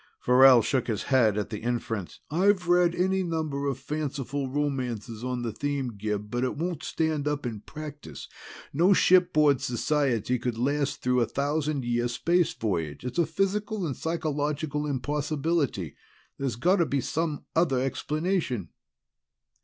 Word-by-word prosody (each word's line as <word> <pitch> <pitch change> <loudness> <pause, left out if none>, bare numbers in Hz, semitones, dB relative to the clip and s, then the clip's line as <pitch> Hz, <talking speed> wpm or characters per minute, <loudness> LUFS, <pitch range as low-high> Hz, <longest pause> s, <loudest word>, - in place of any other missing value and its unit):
Farrell 125 -1 +7
shook 130 +2 0
his 110 -4 -2
head 115 -6 +3
at 105 - -2
the 105 - -4
inference. 115 -5 -3
"I've 185 +2 +2
read 175 -1 +4
any 190 +1 +1
number 155 -5 -2
of 135 -3 -1
fanciful 140 -1 -3
romances 125 -6 -3
on 125 -1 -2
the 115 - -2
theme, 140 -1 -2
Gib, 105 0 -3
but 120 +1 -1
it 130 - -1
won't 170 -1 -2
stand 155 -2 -1
up 145 -2 -1
in 115 -3 -4
practice. 145 - -9 0.5
No 175 +7 +5
shipboard 165 -8 +4
society 125 -2 0
could 120 -1 -2
last 140 +3 -1
through 125 0 +2
a 115 - +2
thousand 145 -1 -1
year 120 0 +1
space 170 +8 +1
voyage. 85 -4 -3
It's 125 +7 -3
a 170 - +3
physical 200 +3 -1
and 140 -5 -2
psychological 150 -2 -2
impossibility. 145 - -1 0.4
There's 135 -5 -1
got 180 +11 +3
to 170 - +2
be 140 - 0
some 150 +3 -2
other 160 -6 +3
explanation." 150 - -1
140 Hz, 150 wpm, -27 LUFS, 120-160 Hz, 0.5 s, Farrell